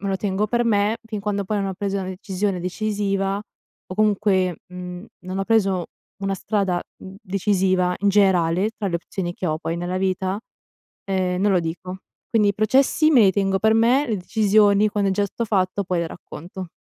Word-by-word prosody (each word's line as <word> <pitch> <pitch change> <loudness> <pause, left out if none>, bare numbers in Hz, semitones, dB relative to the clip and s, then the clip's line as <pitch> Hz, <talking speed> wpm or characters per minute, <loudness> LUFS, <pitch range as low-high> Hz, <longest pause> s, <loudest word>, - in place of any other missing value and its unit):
me 200 - -3
lo 195 - 0
tengo 200 +1 -1
per 240 +1 +1
me. 215 0 +2
Fin 215 -2 -4
quando 200 -1 -2
poi 210 +2 -1
non 195 - -1
ho 190 - -4
preso 200 0 -2
una 185 -1 -4
decisione 190 0 -2
decisiva, 195 0 -1 0.5
o 185 - -7
comunque, 200 -4 +2
mhmm, 180 +2 -8
non 185 +1 -5
ho 195 - -1
preso 195 -5 +2 0.4
una 195 0 0
strada, 195 -3 -1 0.2
mhmm, 190 - -10
decisiva 185 -2 +1
in 200 - +2
generale 190 -1 +3
tra 200 - -2
le 170 - 0
opzioni 175 +1 -5
che 185 - -4
ho 155 -1 -1
poi 165 0 -3
nella 175 +1 -3
vita, 190 +1 -1 0.7
ehm, 185 -1 0
non 205 0 +3
lo 185 - +4
dico. 180 +3 -5 0.3
Quindi 210 -3 +3
i - - 0
processi 270 +8 +3
me 250 -6 +6
li 195 - +6
tengo 195 -1 +1
per 220 0 +3
me, 245 +6 +4
le 220 -3 -1
decisioni 205 +1 +3
quando 200 -1 0
è - - +1
già 205 +1 +1
stato 230 +4 -4
fatto 195 -1 0
poi 180 -1 -1
le 170 - -1
racconto. 180 +3 -9
195 Hz, 200 wpm, -22 LUFS, 185-210 Hz, 0.7 s, me